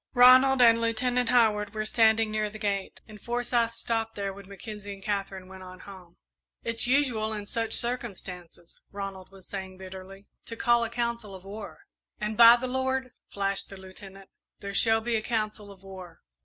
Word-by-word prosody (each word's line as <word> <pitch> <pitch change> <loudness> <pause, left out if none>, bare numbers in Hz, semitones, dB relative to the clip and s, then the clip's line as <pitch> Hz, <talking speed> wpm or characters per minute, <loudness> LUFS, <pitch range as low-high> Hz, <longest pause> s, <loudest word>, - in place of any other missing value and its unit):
Ronald 255 +1 +7
and 230 -1 +6
Lieutenant 245 +1 0
Howard 215 -4 +2
were 215 0 -2
standing 220 0 +3
near 215 0 -1
the 215 - -10
gate, 200 -2 -3
and 210 -2 -13
Forsyth 240 -1 0
stopped 225 -1 -2
there 200 -1 -3
when 200 0 -13
Mackenzie 205 0 -8
and 195 - -15
Katherine 195 -2 -3
went 190 0 -12
on 185 0 -11
home. 185 -3 -13 0.5
"It's 230 +1 0
usual 245 -5 +1
in 210 -1 -5
such 225 +1 -1
circumstances," 190 -8 -4
Ronald 195 -2 -7
was 195 -1 -17
saying, 190 -1 -7
bitterly, 190 +1 -10 0.2
"to 230 - -6
call 235 +1 +3
a 230 - -2
council 235 -3 -3
of 190 0 -13
war." 205 +1 -9 0.4
"And 215 +1 -3
by 235 +1 +9
the 245 +1 -4
Lord," 260 0 -1 0.2
flashed 195 -1 -2
the 195 - -10
Lieutenant, 190 +1 -13 0.3
"there 200 0 -6
shall 225 +2 +3
be 235 +1 -1
a 220 - 0
council 215 -2 -3
of 195 -1 -16
war! 185 -3 -11
215 Hz, 180 wpm, -27 LUFS, 195-235 Hz, 0.5 s, by